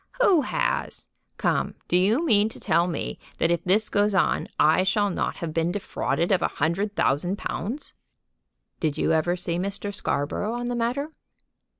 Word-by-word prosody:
"Who 390 -10 +5
has? - - -2 0.3
Come; - - 0
do - - +1
you 215 - +3
mean 215 -6 +4
to - - -11
tell 170 +2 +2
me 165 -4 -4 0.2
that 165 - +2
if 170 -1 0
this 210 +4 +2
goes 205 0 +1
on 185 - +2
I 155 +4 +5
shall 205 +2 +1
not - - -2
have 165 -2 -5
been 165 +2 +1
defrauded 190 -2 -1
of 190 - +3
a - - +2
hundred 190 +7 -1
thousand 175 +8 +1
pounds?" 245 +9 -4 0.9
"Did 155 -2 -1
you - - +1
ever 160 +3 +2
see 170 -1 -3
Mr. 200 +2 -3
Scarborough 200 +5 -2
on 240 0 -3
the 245 - -1
matter?" 250 +6 -1
195 Hz, 175 wpm, -25 LUFS, 170-220 Hz, 0.9 s, Who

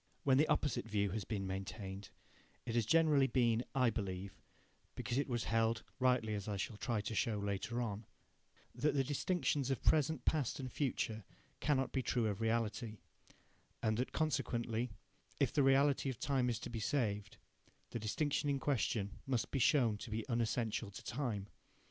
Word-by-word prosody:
When 135 -1 +4
the 150 - +5
opposite 135 -7 +1
view 100 -2 +1
has 105 +1 -3
been 100 -4 -2
maintained, 95 +1 -5 0.6
it 115 - -3
has 115 -2 +1
generally 155 -4 +5
been, 120 -3 +2
I 125 -3 +4
believe, 100 -2 -4 0.5
because 120 - -1
it 140 - 0
was 120 -3 -1
held 115 0 +1 0.2
(rightly, 125 -4 +2
as 100 -1 -3
I 105 -1 -2
shall 105 +2 -3
try 115 -1 -1
to 110 - -4
show 110 -1 +1
later 100 +4 -2
on) 105 -1 -4 0.7
that 150 - +1
the 135 - +3
distinctions 145 -1 0
of 135 - -1
present, 155 -1 +3
past 145 -6 +1
and 130 -2 -5
future 115 -6 -1 0.4
cannot 135 -3 +1
be 130 - 0
true 120 -1 0
of 105 0 -1
reality, 110 0 0 0.9
and 110 -1 +2
that 125 - -1
consequently, 125 -6 0 0.5
if - - +2
the 145 - +3
reality 135 +1 +4
of 130 - -5
time 130 -2 +1
is 115 - 0
to - - -6
be 115 - -3
saved, 105 -4 -1 0.5
the 120 - -3
distinction 145 +7 0
in 140 - +2
question 110 -7 -1
must 125 -3 0
be 135 - 0
shown 125 -8 +4
to - - -7
be 110 0 -2
unessential 115 -2 0
to 100 - -10
time. 110 -6 -2
115 Hz, 175 wpm, -36 LUFS, 105-135 Hz, 0.9 s, the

